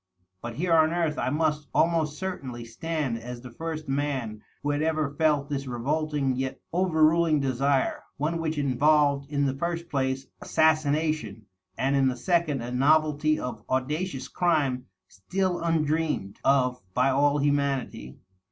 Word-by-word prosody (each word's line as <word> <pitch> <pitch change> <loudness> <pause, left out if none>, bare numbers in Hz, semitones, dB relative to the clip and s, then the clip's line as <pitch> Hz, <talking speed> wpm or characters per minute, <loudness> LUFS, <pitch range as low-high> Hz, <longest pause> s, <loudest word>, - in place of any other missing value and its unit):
But 120 0 -6
here 170 +5 0
on 160 0 +4
earth 165 -3 0
I - - 0
must 150 0 0
almost 160 -3 +2
certainly 135 -11 -5
stand 140 0 -3
as 120 +1 -8
the 125 -1 -10
first 160 +2 -5
man 135 -6 -2 0.2
who 145 - +1
had 145 +1 -1
ever 155 -2 0
felt 150 -2 +2
this 140 -2 -3
revolting 140 +2 -1
yet 130 +1 -3
overruling 165 -3 +3
desire 135 0 +1
• - - -17 0.2
one 165 +3 -1
which 160 -1 -2
involved 140 +1 +2
in 145 -1 +1
the 135 - 0
first 170 +3 -3
place 135 -1 -1 0.2
assassina 155 -1 +2
tion, 115 -8 -9 0.3
and 135 +2 +1
in 135 -1 +3
the 125 -1 -1
second 160 -4 0
a 120 - -5
novelty 155 +3 +3
of 120 -4 -5
audacious 135 +4 -2
crime 140 -8 0 0.2
still 180 - -2
undreamed 155 -9 0
of 125 -2 +2
by 130 +2 +3
all 145 +2 +3
humanity. 140 - -1
145 Hz, 150 wpm, -27 LUFS, 130-160 Hz, 0.3 s, on